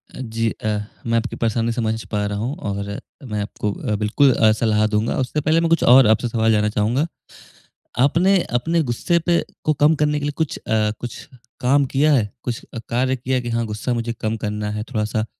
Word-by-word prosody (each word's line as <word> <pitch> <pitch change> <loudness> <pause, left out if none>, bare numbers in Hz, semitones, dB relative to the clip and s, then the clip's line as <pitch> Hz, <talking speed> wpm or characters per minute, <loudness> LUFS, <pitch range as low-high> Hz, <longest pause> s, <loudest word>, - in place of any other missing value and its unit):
अ, - - -9
जी। 115 -2 -1
अ, 105 -1 -2 0.3
मैं 115 0 +1
आपकी 115 - -2
परेशानी 115 0 0
समझ 110 -1 -2
पा 105 -1 0
रहा 100 0 -2
हूँ 120 +7 -2
और 100 - -4 0.3
मैं 105 -1 -1
आपको 105 0 -3
अ, 105 - -3
बिल्कुल 110 +7 +3
अ, 110 -2 +4
सलाह 110 -1 +2
दूँगा। 105 +1 0
उससे 130 +4 -1
पहले 155 +3 +3
मैं 165 - +1
कुछ 165 - +3
और 125 -1 +7
आपसे 110 +2 +3
सवाल 115 -1 +1
जानना 105 -1 +2
चाहूँगा। 115 +7 +1 0.9
आपने 170 +9 +4 0.2
अपने 165 +6 +1
गुस्से 140 +7 0
पे 175 -1 +2 0.2
को 155 - +2
कम 150 +2 +3
करने 150 0 +1
के 145 - -4
लिए 145 - -1
कुछ 160 -3 -1
अ, 110 -1 0
कुछ 120 +1 -6 0.4
काम 140 +3 +3
किया 150 +3 +4
है? 110 -7 +2
कुछ 120 -2 -4
अ, 115 - -4
कार्य 130 +2 +1
किया 130 +1 -2
है 125 - +1
कि, 120 - -5
"हाँ, 115 0 0
गुस्सा 110 +3 -3
मुझे 115 0 -2
कम 110 0 -1
करना 105 -1 -3
है 105 0 -3
थोड़ा-सा 110 0 -1
115 Hz, 215 wpm, -21 LUFS, 110-135 Hz, 0.9 s, और